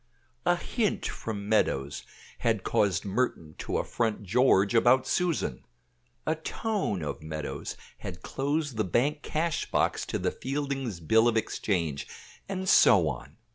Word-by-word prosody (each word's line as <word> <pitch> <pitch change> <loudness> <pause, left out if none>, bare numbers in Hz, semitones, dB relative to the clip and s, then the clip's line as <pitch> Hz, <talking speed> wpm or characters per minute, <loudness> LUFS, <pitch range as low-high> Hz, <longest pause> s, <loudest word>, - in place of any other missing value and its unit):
A 175 - +5
hint 210 +3 -1
from 100 -3 -4
Meadows 70 -10 +1 0.4
had - - +1
caused 95 -4 +1
Merton 95 -7 -1
to - - -2
affront 110 -3 -1
George 100 -1 +4
about 120 +3 +5
Susan. 165 - 0 0.6
A 155 - +2
tone 160 - -2
of 75 - -4
Meadows 80 -1 -5 0.2
had 90 -2 -7
closed 145 -1 -1
the 110 - +2
bank 140 - +1
cash 160 +1 -1
box - - +1
to - - -1
the - - 0
Fieldings' 135 -7 -3
bill 110 +8 +4
of 115 -1 +2
exchange, 85 -9 -1 0.4
and 190 -1 -3
so - - +6
on. - - -7
115 Hz, 135 wpm, -28 LUFS, 95-145 Hz, 0.6 s, so